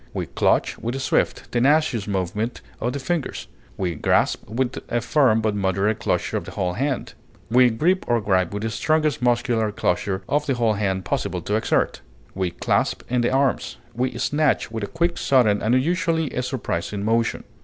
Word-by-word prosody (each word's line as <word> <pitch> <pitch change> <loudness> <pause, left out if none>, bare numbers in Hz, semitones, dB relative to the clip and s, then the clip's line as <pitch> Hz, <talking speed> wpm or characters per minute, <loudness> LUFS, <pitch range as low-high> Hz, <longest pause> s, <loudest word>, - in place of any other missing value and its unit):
We - - -2
clutch - - +1
with 120 +3 -3
a - - -3
swift, 130 - 0
tenacious 130 -3 +2
movement 105 +4 -2 0.2
of 120 +2 -1
the - - -2
fingers; 160 +1 -3 0.3
we 90 -3 -1
grasp 80 - +1
with 125 +3 -1
a 120 - +1
firm 120 -3 +3
but 110 -1 0
moderate 100 +2 0
closure - - -1
of - - -5
the - - -8
whole 90 -1 0
hand; 135 +4 -2 0.4
we 125 +1 +6
grip 170 +12 +1
or 120 -1 +2
gripe 95 -4 +1
with 105 +1 -4
the 115 - -1
strongest 155 +4 +1
muscular 120 -3 +1
closure 95 0 -1
of 145 +1 0
the 135 - +1
whole 115 -3 +2
hand 95 -2 -1
possible - - -2
to - - -1
exert. - - 0 0.3
We 95 -1 -1
clasp - - 0
in 125 -1 +2
the 120 - +2
arms. 135 +1 0 0.2
We 125 +1 -2
snatch 145 +2 +1
with 110 -2 -4
a - - -2
quick, 170 +5 -1
sudden, 115 -7 +3
and 115 +3 +2
usually 165 0 0
a 125 - -2
surprising 105 -6 -3
motion. 115 +1 +1
120 Hz, 185 wpm, -23 LUFS, 105-135 Hz, 0.4 s, we